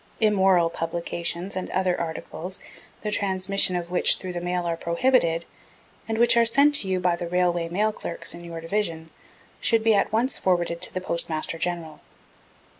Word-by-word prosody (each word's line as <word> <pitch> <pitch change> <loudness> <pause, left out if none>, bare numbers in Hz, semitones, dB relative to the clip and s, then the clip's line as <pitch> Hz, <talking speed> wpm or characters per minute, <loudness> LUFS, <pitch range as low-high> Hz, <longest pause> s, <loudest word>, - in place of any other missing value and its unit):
Immoral 190 -5 +3
publications 170 +2 -3
and 185 - -4
other 185 -1 0
articles, 165 +2 -5 0.4
the 210 - -2
transmission 195 -2 +1
of 175 0 -4
which 180 - +3
through 185 -1 -7
the 175 - -4
mail 175 0 -2
are 170 -1 -1
prohibited 170 -1 +1 0.6
and 225 0 -2
which 235 0 +4
are 235 - +5
sent 280 +6 +4
to 245 -9 +6
you 185 -1 0
by 180 -1 +1
the 175 0 -5
Railway 175 -1 0
Mail 210 +5 +1
Clerks 170 - -3
in 175 - -10
your 165 -1 -7
Division 165 -3 -3 0.5
should 225 -1 +2
be 225 -1 +4
at 200 0 +2
once 235 +5 +1
forwarded 175 -2 0
to - - -1
the 185 - -4
Postmaster 165 -2 -1
General. 170 -2 -3
180 Hz, 175 wpm, -25 LUFS, 170-200 Hz, 0.6 s, to